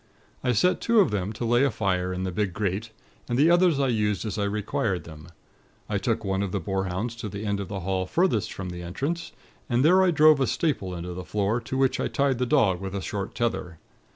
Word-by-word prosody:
I 125 - +2
set 125 - +2
two 230 -1 +3
of 200 - +4
them 100 -1 -1
to 115 +2 -4
lay 120 +3 +3
a 140 - +4
fire 95 -5 -1
in 90 0 -3
the 95 - -2
big 100 0 -1
grate, 105 +2 -2 0.4
and 120 - 0
the 155 +5 +5
others 175 -4 +4
I 135 -2 +2
used 105 -2 0
as 105 -1 -3
I 100 - +1
required 100 -2 -1
them. 80 0 -11 0.6
I 105 -2 -1
took 115 +2 -1
one 95 0 0
of 100 -2 -2
the 100 - -1
boarhounds 95 +4 -2
to 110 -3 -5
the 100 +2 -6
end 100 -1 -1
of 100 - -4
the 100 -2 -5
hall 95 0 -1
furthest 115 - +1
from 95 -2 -6
the 90 0 -7
entrance, 140 - -3 0.4
and 125 +3 +2
there 185 +4 +6
I 185 - +4
drove 155 -2 +6
a 135 - +2
staple 100 - -1
into 90 +1 -5
the 90 +1 -6
floor, 105 +5 -1
to 130 - -4
which 135 -1 +2
I - - 0
tied 135 -3 0
the 125 - 0
dog 95 -6 +3
with 95 0 -5
a 100 - -2
short 100 -2 -4
tether. 110 -8 -2
105 Hz, 240 wpm, -26 LUFS, 95-130 Hz, 0.6 s, there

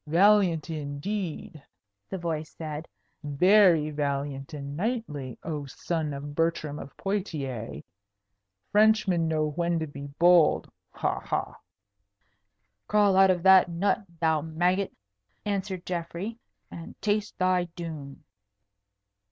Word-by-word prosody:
"Valiant, 180 -1 +4
indeed!" 155 +2 -4 0.5
the 190 - -3
voice 160 -3 -3
said. 155 0 -6 0.4
"Very 165 +1 +4
valiant 140 -1 -3
and 140 -2 -6
knightly, 170 - -3
oh 150 -3 -4
son 160 +2 -3
of 145 +1 -6
Bertram 155 -2 -1
of 140 - -10
Poictiers! 135 - -3 0.9
Frenchmen 210 -5 +4
know 155 -1 0
when 170 +2 0
to 160 - -1
be 140 -1 -8
bold. 175 -2 +5 0.2
Ha! - - -1
ha!" - - -3 1.3
"Crawl 205 -2 +4
out 190 0 +6
of 180 -2 +1
that 190 -1 +7
nut, 195 +5 0 0.2
thou 160 -2 +2
maggot," 175 +5 0 0.5
answered 195 -3 -3
Geoffrey, 180 +6 -4 0.3
"and 165 - -10
taste 210 0 -1
thy 185 -1 +2
doom." 155 -5 -7
165 Hz, 110 wpm, -27 LUFS, 150-190 Hz, 1.3 s, that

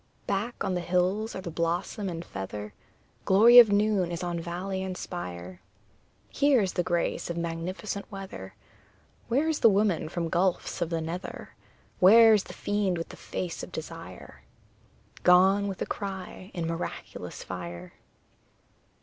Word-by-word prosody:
Back 205 +5 -2
on 185 - -1
the 180 - -1
hills 185 +5 0
are 190 - -4
the 175 -3 -6
blossom 170 +4 -2
and 170 -1 -6
feather, 105 +2 -6 0.5
Glory 230 +6 +8
of 225 -4 +8
noon 205 -3 +2
is 170 +1 -4
on 175 -1 -2
valley 180 +3 -4
and 190 -1 -4
spire; 90 - -7 0.7
Here 280 -2 +3
is 190 -2 -1
the - - +1
grace 175 0 -1
of 170 - -3
magnificent 170 +5 -4
weather, 190 - -8 0.7
Where 275 +7 +1
is 320 -2 0
the 230 - +7
woman 200 -5 +1
from 170 -1 -2
gulfs 175 +2 0
of 170 - 0
the 165 -1 -1
nether? 170 +4 -6 0.5
Where 225 +4 +8
is 205 -2 +2
the - - -9
fiend 205 -3 -1
with 165 - -5
the - - -10
face 175 -2 -5
of - - -8
desire? - - -9 0.8
Gone, 190 +3 +5
with 195 -2 -3
a - - -4
cry, 190 -1 -6
in 170 -2 -2
miraculous 165 +1 -5
fire! 85 0 -7
180 Hz, 155 wpm, -28 LUFS, 170-200 Hz, 0.8 s, Glory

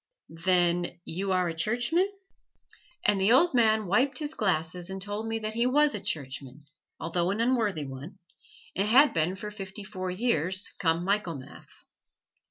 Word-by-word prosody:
"Then 175 -2 +2
you 190 +4 -3
are 185 -1 +2
a 165 - -2
Churchman?" 240 - +1 0.9
And 200 -2 +3
the 195 +4 +4
old 335 +6 +5
man 220 -3 +3
wiped 250 +10 +2
his 300 -1 -3
glasses 175 - -1
and 190 0 -5
told 205 +3 -4
me 225 0 -1
that 215 -1 -4
he 235 +2 +1
was 295 +3 +4
a 210 - -2
Churchman, 140 -3 -5 0.3
although 170 +2 -1
an 200 +3 -1
unworthy 225 - +1
one, 135 +8 -9 0.6
and 195 +2 +1
had 270 +7 +6
been 165 +3 +1
for 210 +2 -7
fifty 200 0 -8
four 185 -2 -5
years, 185 -2 0
come 165 -1 +1
Michaelmas. 180 -9 -4
195 Hz, 160 wpm, -28 LUFS, 175-225 Hz, 0.9 s, had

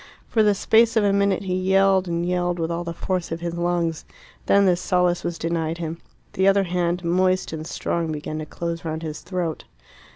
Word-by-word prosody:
For 225 - +2
the 210 -1 +4
space 225 +3 +3
of 220 - +4
a 200 -1 +3
minute 200 -1 +2
he 185 -2 -2
yelled 190 0 +3
and 170 0 -1
yelled 175 0 0
with 165 0 -2
all 170 +1 -2
the 170 - -4
force 180 +1 -3
of 165 +1 -4
his 170 -1 -3
lungs. 170 -1 -1 0.4
Then 200 0 +5
this 180 -1 +2
solace 180 -1 +1
was 170 -1 -3
denied 165 0 -2
him. 165 0 -5 0.3
The 190 +1 +2
other 195 0 +4
hand, 175 0 -1
moist 185 +1 +1
and 160 0 -5
strong, 170 -1 -2
began 155 0 -4
to 155 - -6
close 170 0 -4
round 160 0 -4
his 155 -1 -5
throat. 180 -4 -3
175 Hz, 205 wpm, -23 LUFS, 165-185 Hz, 0.4 s, Then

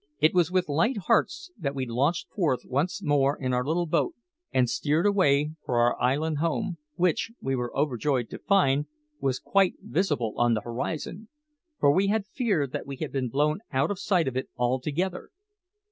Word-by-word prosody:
It 155 +1 +4
was 175 -3 +3
with 185 -1 +1
light 165 - +1
hearts 360 - 0
that 140 -4 -2
we 130 -1 -2
launched 140 +9 0
forth 150 - 0
once 155 +9 -1
more 145 -2 +2
in 130 -2 -1
our 125 0 +1
little 165 +5 0
boat 330 - 0 0.4
and 125 -1 +3
steered 150 +7 0
away 150 -8 +3
for 120 - -1
our 120 +1 +3
island 145 +4 +1
home, 170 +2 -1 0.2
which, 180 +5 +1
we 135 0 -1
were 125 -1 -3
overjoyed 135 -3 0
to - - -7
find, 150 -8 +2 0.3
was 130 -2 0
quite 195 +4 +2
visible 145 - -1
on 120 -1 +3
the 110 - -2
horizon, 155 - -4 0.5
for 140 - +5
we 190 +6 +2
had 210 0 +1
feared 200 - -1
that - - -5
we 140 - -5
had 150 +2 -5
been 130 -3 -1
blown 150 - +1
out 135 +6 +1
of 195 - -4
sight 180 -6 +1
of 130 - -2
it 130 - -2
altogether. 145 +9 -1
150 Hz, 185 wpm, -27 LUFS, 130-180 Hz, 0.5 s, for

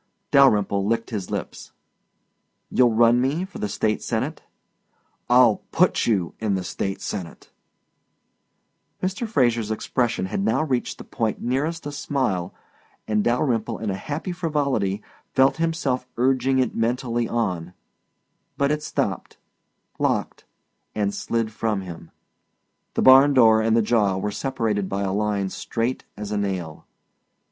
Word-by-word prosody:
Dalyrimple 105 -8 +4
licked 115 +3 -1
his 100 -5 -4
lips. - - -6 1.0
"You'll 120 -3 +4
run 120 +1 +5
me 145 +8 0
for 190 - -10
the 105 - -2
State 110 +1 0
Senate?" 130 +7 -2 0.9
"I'll 120 -3 +6
PUT - - +2
you 95 -7 +1
in 105 -3 0
the 95 - -2
State 95 +2 -4
Senate." 90 -5 -6 1.5
Mr. 190 +5 -2
Fraser's 120 - +1
expression 115 -2 -1
had 95 - -3
now 110 +8 +2
reached 130 -5 -2
the - - -9
point 110 -2 -2
nearest 145 +7 -2
a 145 - -4
smile 130 -11 -1 0.6
and 105 -1 +1
Dalyrimple 120 -2 0
in 110 -3 -3
a - - -2
happy 150 - -4
frivolity 140 - -1 0.3
felt 135 +2 +4
himself 160 -6 -1
urging 130 +1 +2
it 130 -2 +1
mentally 120 0 -1
on 90 -6 -2 0.8
but 140 +1 +2
it 150 0 -1
stopped, - - -3 0.6
locked, - - -1 0.5
and 100 -1 0
slid 115 -1 -2
from 110 -2 -1
him. 90 -3 -9 0.9
The - - +1
barn 135 +2 +7
door 110 -3 +6
and 110 +1 +2
the 115 - +3
jaw 105 -4 +2
were 105 +2 -2
separated 105 -3 -2
by 100 +1 -2
a 95 -1 -1
line 100 -1 0
strait 115 +6 -3
as 105 0 -6
a 105 - -1
nail. 95 -6 -4
115 Hz, 140 wpm, -23 LUFS, 105-130 Hz, 1.5 s, barn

